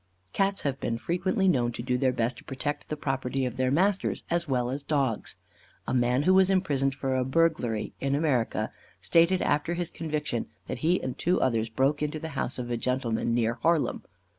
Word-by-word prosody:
Cats 195 0 +1
have 140 -2 -1
been 115 - -1
frequently 185 +7 0
known 125 -9 +2
to 120 - -5
do 125 0 0
their 130 +1 +2
best 120 0 -1
to - - -15
protect 145 +2 -4
the 150 - -3
property 135 -1 -1
of 125 -1 -3
their 130 0 +1
masters, 190 +8 +1
as 170 0 +1
well 125 -2 0
as 140 +2 -4
dogs. 135 -7 -1 0.5
A - - -1
man 125 +2 +2
who 185 - +4
was 190 0 +5
imprisoned 140 -8 +1
for 135 -1 -1
a 130 - +2
burglary, 130 -6 +1
in 135 0 0
America, 140 -6 0 0.3
stated 170 +2 +3
after 150 +4 +1
his 175 -1 -2
conviction, 150 -7 -3 0.2
that 125 - -5
he 170 +7 +2
and 130 - -3
two 180 +2 +2
others 115 -3 +1
broke 135 +6 +1
into 150 +1 -1
the 160 +1 -5
house 135 -4 -2
of 120 -1 -4
a 120 - 0
gentleman, 120 -2 0
near 115 -1 +2
Harlem. 165 -1 +2
135 Hz, 200 wpm, -28 LUFS, 125-165 Hz, 0.5 s, was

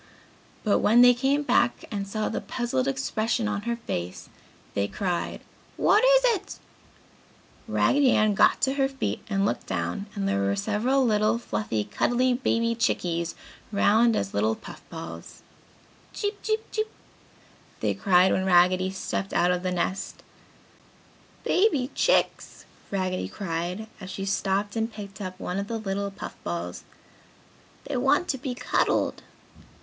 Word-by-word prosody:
But 210 - +3
when 230 +3 +5
they 245 0 +8
came 275 +4 +1
back 255 - +2
and 200 -2 -3
saw 215 +2 -2
the - - -3
puzzled 240 - -2
expression 215 - -1
on 205 -1 -2
her 235 - +1
face, 90 - -5 0.4
they 100 0 0
cried, 180 - -3 0.4
"What 425 - +4
is - - +6 0.2
it?" - - -11 1.1
Raggedy 280 -1 +3
Ann 215 -1 +3
got - - +4
to 265 - +2
her 275 -1 +2
feet 270 0 -3
and 195 -1 +1
looked - - -2
down 85 - -3
and 195 -1 -1
there 100 - +1
were 100 0 +1
several 245 - +1
little 215 0 +2
fluffy, 105 - -2
cuddly 245 - +1
baby 230 -2 +1
chickies, 170 -7 -1 0.4
round 220 +3 +4
as 100 0 -2
little 110 +2 +1
puff - - -11
balls. 85 0 -9 0.7
"Cheep! 410 -1 -3
Cheep! 440 0 -1
Cheep!" 435 0 -1 0.9
they - - 0
cried 185 -2 +4
when 190 - +1
Raggedy 185 0 +4
stepped 190 0 -4
out 175 +1 +3
of 180 0 0
the 185 0 -2
nest. 180 +2 -3 1.2
"Baby 300 - +2
Chicks!" - - +1 0.2
Raggedy 185 -2 -1
cried, 180 +2 -4
as 190 -2 -8
she 195 +1 -4
stooped 200 +1 0
and 225 +1 -1
picked 200 -2 -9
up 185 -1 -6
one 180 0 -3
of 200 - -3
the 230 - -3
little 200 -1 -2
puff 195 - -8
balls. 85 +1 -4 1.0
"They 285 - -2
want 270 +7 +2
to 270 - -1
be 255 -2 -4
cuddled!" - - 0
200 Hz, 150 wpm, -26 LUFS, 180-240 Hz, 1.2 s, they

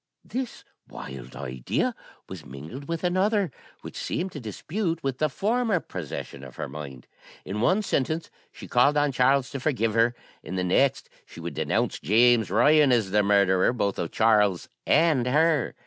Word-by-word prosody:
This 255 -1 -5 0.3
wild 65 -1 -9
idea 65 -2 -2 0.3
was 95 -5 -9
mingled 75 - -9
with 165 0 -3
another, 190 0 +1 0.3
which - - -10
seemed 185 +3 -3
to 150 - -7
dispute 165 - -3
with 135 -1 -2
the 155 - +2
former 220 - 0
possession 75 - -7
of 65 -2 -11
her - - -4
mind. 70 -2 -9 0.4
In 105 +2 -4
one 185 - +2
sentence 155 -1 -1 0.2
she - - -11
called 140 +4 +3
on 145 -1 +2
Charles 135 +1 +2
to 135 - -4
forgive 125 -6 0
her, 115 +2 +2 0.3
in 95 - -7
the 90 - -1
next 135 +9 +2 0.2
she - - -14
would - - -5
denounce - - -1
James 115 +5 +4
Ryan 145 +7 +5
as 110 -6 +2
the 105 +1 +4
murderer, 100 -2 +3
both 100 -5 -1
of 85 - -2
Charles 105 -5 +2 0.2
and 150 -7 +3
her. 150 +1 +2
125 Hz, 165 wpm, -26 LUFS, 95-155 Hz, 0.4 s, Ryan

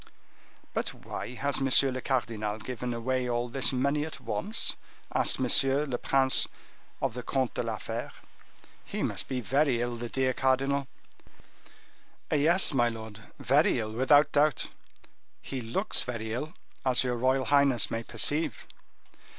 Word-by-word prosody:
"But - - -2
why 125 - -7
has 140 +1 -1
monsieur 135 0 +5
le 130 0 -4
cardinal 110 -5 -2
given 125 +2 -5
away 125 +2 -1
all 120 0 -1
this 135 +1 +2
money 140 +3 0
at 160 - -7
once?" 215 +3 0 0.4
asked - - +1
M. 130 - +1 0.5
le 120 - 0
Prince 135 -1 +4 0.6
of - - 0
the 125 - -5
Comte 130 0 -1
de - - -2
la - - -3
Fere. - - -5 0.7
"He - - -4
must - - -2
be 130 -2 -3
very 135 -1 +1
ill, 120 0 -2
the 120 0 -5
dear 130 0 +1
cardinal!" 135 +1 +1 1.4
"Yes, 160 +4 +3
my 120 -3 +3
lord, 110 -2 -8 0.2
very 140 +3 +3
ill, 110 -2 -3
without 140 +5 +4
doubt; 150 0 +2 0.7
he 130 -2 -5
looks 115 0 -1
very 110 -3 -4
ill, 150 +6 -4 0.3
as 130 -1 +3
your 125 -1 -1
royal 130 +2 +1
highness 140 -4 +3
may 115 - -2
perceive." 145 +5 -2
130 Hz, 150 wpm, -28 LUFS, 120-140 Hz, 1.4 s, monsieur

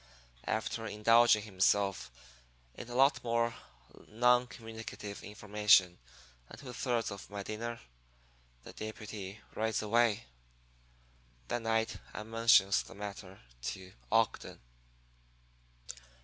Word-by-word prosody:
"After 110 +1 -2
indulging 110 +1 +4
himself 100 - +1 0.6
in - - -9
a 120 - -6
lot 135 +3 +4
more 115 0 +1 0.5
non 125 +2 +3
communicative 110 -3 -8
information 105 -3 +3 0.5
and - - -11
two 130 -3 -9
thirds 120 -2 -1
of 100 -1 -9
my 100 -1 -5
dinner, 115 +3 -5 0.8
the - - -11
deputy 105 -2 -7
rides 110 0 -1
away. 115 0 +2 1.3
"That 120 - -1
night 115 0 0 0.2
I 105 - -4
mentions 110 -3 +4
the - - -12
matter 100 -2 -8 0.2
to 95 +8 -6 0.2
Ogden. - - +1
110 Hz, 105 wpm, -32 LUFS, 100-115 Hz, 1.3 s, indulging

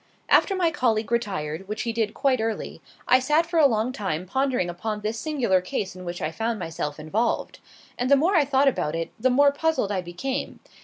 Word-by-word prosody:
After 390 - +4
my 350 -3 +2
colleague 225 -7 0
retired, 190 -7 -2
which 210 +1 -3
he 230 - -2
did 225 -1 -1
quite 260 -4 +1
early, 225 -1 -4 0.3
I 255 - +6
sat 300 +6 +2
for 335 0 0
a 295 - +7
long 225 0 0
time 185 -8 -3
pondering 260 -2 0
upon 210 +5 -4
this 215 +2 -3
singular 245 - +1
case 185 +1 -4
in 185 0 -9
which 175 0 -5
I 155 - -1
found 225 +5 -2
myself 160 -4 -4
involved. 205 +10 -1 0.4
And 250 +1 0
the 280 - +7
more 335 +8 +2
I 315 - +5
thought 275 0 +2
about 160 - 0
it 165 0 -3
the 255 +4 +3
more 280 +3 +5
puzzled 300 -7 0
I 190 -2 0
became. 180 +10 -4
225 Hz, 210 wpm, -25 LUFS, 185-270 Hz, 0.4 s, a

